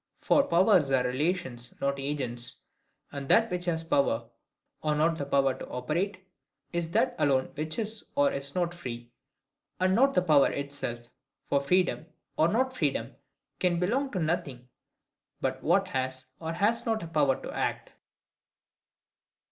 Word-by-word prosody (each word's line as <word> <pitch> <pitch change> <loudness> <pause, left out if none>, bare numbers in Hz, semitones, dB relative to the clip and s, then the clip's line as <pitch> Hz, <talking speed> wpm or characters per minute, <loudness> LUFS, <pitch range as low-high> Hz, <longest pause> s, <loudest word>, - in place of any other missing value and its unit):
For 285 - +4
powers 175 -3 +4
are 130 -2 +3
relations, 130 -2 -2
not 140 0 0
agents: 130 -4 -4 0.6
and 140 -1 -6
that 230 0 +5
which 180 -1 -3
has 165 -2 0
the 165 - -18
power 115 -5 +2 0.5
or 150 -1 +1
not 160 +2 +2
the 140 - -3
power 135 -1 +3
to - - -9
operate, 185 +9 -2 0.5
is 170 -1 -1
that 245 +7 +1
alone 135 -2 +2
which 155 +2 -4
is 220 -1 -3
or 285 0 +4
is 140 0 -5
not 175 -1 0
free, 120 -8 -7 0.7
and 185 0 +3
not 270 +6 +4
the 180 - +4
power 150 -5 +5
itself. 140 -4 -4 0.4
For 140 - +3
freedom, 180 +1 +1 0.3
or 160 - +4
not 255 +7 +1
freedom, - - -1 0.4
can 180 -2 +2
belong 250 +11 0
to 185 - -1
nothing 155 -7 -2 0.7
but - - -2
what - - +2
has 130 0 -3
or 160 0 -4
has 205 +7 +1
not 225 -3 -1
a - - -5
power 145 -5 +2
to - - -7
act. - - -2
160 Hz, 155 wpm, -29 LUFS, 135-185 Hz, 0.7 s, that